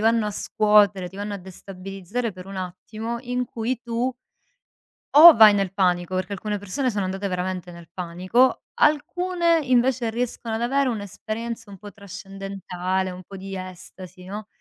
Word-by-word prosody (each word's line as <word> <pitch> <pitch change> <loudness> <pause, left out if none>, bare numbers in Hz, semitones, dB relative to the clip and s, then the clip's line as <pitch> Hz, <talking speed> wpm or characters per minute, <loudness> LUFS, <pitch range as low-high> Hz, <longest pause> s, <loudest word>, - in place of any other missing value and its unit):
vanno 225 0 +3
a - - -2
scuotere, 205 -3 +3
ti 190 - -14
vanno 205 +1 -4
a 200 - -5
destabilizzare 195 +4 -6
per 180 0 -11
un 195 0 -8
attimo 215 +6 -5
in 250 0 -2
cui 235 +1 -3
tu 240 +2 -1 1.0
o 320 +3 +11
vai 215 -2 +9
nel 195 -2 0
panico, 180 -2 +1
perché 185 +2 -2
alcune 210 +1 -3
persone 205 +7 -2
sono 205 -4 -1
andate 195 +2 -3
veramente 180 -1 -3
nel 170 -1 -13
panico, 185 +8 +1
alcune 335 +3 +2
invece 250 -2 +2
riescono 230 -1 -3
ad 225 - -3
avere 270 +3 +1
un'esperienza 220 +1 -5
un 195 - -10
po' 205 0 -11
trascendentale, 195 -2 -4
un 180 0 -9
po' 195 +2 -10
di 195 0 -7
estasi, 185 0 -10
no? 205 +3 -7
205 Hz, 160 wpm, -24 LUFS, 185-235 Hz, 1.0 s, o